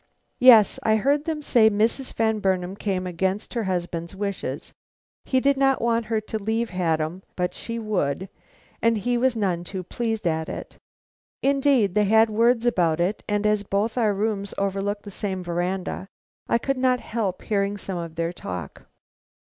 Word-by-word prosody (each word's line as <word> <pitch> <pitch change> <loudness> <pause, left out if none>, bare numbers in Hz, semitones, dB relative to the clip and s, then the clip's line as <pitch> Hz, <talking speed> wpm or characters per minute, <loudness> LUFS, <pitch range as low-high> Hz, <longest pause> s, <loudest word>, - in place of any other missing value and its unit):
"Yes; 230 -5 +7
I 220 - +3
heard 280 +7 +1
them 310 -2 -3
say 225 -5 +5
Mrs. 225 +5 0
Van 220 -1 +1
Burnam 185 -1 0
came 190 -3 -2
against 190 +3 -2
her 230 -3 -1
husband's 175 -1 -3
wishes. 200 -1 -4 0.5
He 260 - +2
did 275 +1 +2
not 270 -1 +3
want 230 0 +1
her 220 -1 +1
to 215 0 -4
leave 225 +3 -1
Haddam, 165 -1 -1
but 180 -1 -1
she 230 0 -5
would, 190 -6 -1 0.5
and 230 -1 +3
he 245 +4 0
was 250 +1 +2
none 185 -6 0
too 185 +1 -6
pleased 225 +2 -3
at 160 -1 0
it. - - -7 0.7
Indeed 270 -7 +3
they 210 +1 +3
had 220 +2 +4
words 230 +2 +3
about 170 -9 +2
it, 180 +5 0
and 205 0 0
as 210 -1 +3
both 205 +3 -1
our 220 -5 +2
rooms 200 -1 -2
overlook 200 +1 -1
the 205 - -9
same 190 -2 -3
veranda, 180 +2 -3 0.4
I - - +4
could 275 +3 -2
not 255 -1 +3
help 210 -7 -3
hearing 200 -1 0
some 190 -2 -4
of 165 -1 -6
their 165 +1 -2
talk." 90 - -7
205 Hz, 175 wpm, -24 LUFS, 185-230 Hz, 0.7 s, Yes